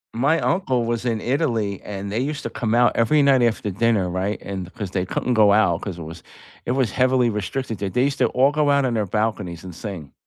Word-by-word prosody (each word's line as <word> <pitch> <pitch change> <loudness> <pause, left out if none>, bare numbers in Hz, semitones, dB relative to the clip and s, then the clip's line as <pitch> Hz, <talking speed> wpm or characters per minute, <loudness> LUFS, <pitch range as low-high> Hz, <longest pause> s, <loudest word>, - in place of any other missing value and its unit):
My 145 +7 +2
uncle 130 -10 0
was 115 0 -2
in 115 -2 0
Italy, 115 - -1
and 100 -1 -6
they 110 - -1
used 145 +3 -3
to - - -4
come 115 -2 -1
out 120 0 +4
every 140 +6 +3
night 135 -3 +4
after 110 -3 0
dinner, 105 -1 +1
right? 95 +4 -2
And 95 -2 -6
'cause 100 -5 -5
they 90 -1 -2
couldn't 125 - -1
go 105 -3 +5
out, 95 -5 +3
'cause 95 -4 -5
it 85 - -7
was 80 +2 -9 0.5
it - - +1
was 130 -6 +1
heavily 130 -2 +2
restricted 110 +3 -4
there. 100 - -2
They 125 +7 +1
used 140 0 -1
to - - +4
all 135 +3 +3
go 150 -1 +1
out 140 -1 +3
on 125 - 0
their 105 -3 -1
balconies 105 -5 -2
and 90 -2 -8
sing. 85 - -8
110 Hz, 240 wpm, -22 LUFS, 100-130 Hz, 0.5 s, go